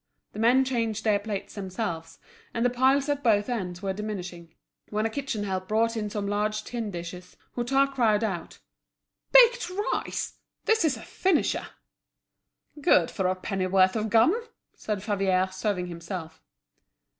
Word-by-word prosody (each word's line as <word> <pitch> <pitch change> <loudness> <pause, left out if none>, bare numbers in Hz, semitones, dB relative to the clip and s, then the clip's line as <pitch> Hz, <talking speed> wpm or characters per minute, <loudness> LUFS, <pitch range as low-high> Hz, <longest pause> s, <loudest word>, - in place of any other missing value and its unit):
The 210 - -7
men 250 +4 +4
changed 230 -4 -1
their 210 -2 +3
plates 205 -1 -5
themselves, 180 -5 -4 0.4
and 230 +1 +1
the 245 - +3
piles 265 +3 +3
at 290 -1 0
both 210 -5 +3
ends 190 -7 -3
were 195 -1 -1
diminishing. 180 -5 -6 0.3
When 215 +1 -1
a 225 - 0
kitchen 255 -5 -3
help 190 -2 -3
brought 230 +2 +1
in 210 -2 -2
some 205 -1 -3
large 210 +1 -1
tin 230 -2 -4
dishes, 180 0 -8 0.2
Hutin 270 +3 +3
cried 225 -5 +2
out: 190 -6 -3 0.7
"Baked 485 -5 +6
rice! 415 +7 -3 0.3
this 445 -3 +3
is 290 -7 +2
a 225 - -10
finisher!" 375 -5 0 1.1
"Good 170 -10 +4
for 190 - 0
a 185 - +1
penn'orth 185 0 +2
of 220 0 -1
gum!" 225 - +5 0.4
said 210 -3 -4
Favier, 195 -3 +1
serving 185 -1 -1
himself. 170 -2 -7
210 Hz, 150 wpm, -27 LUFS, 185-240 Hz, 1.1 s, Baked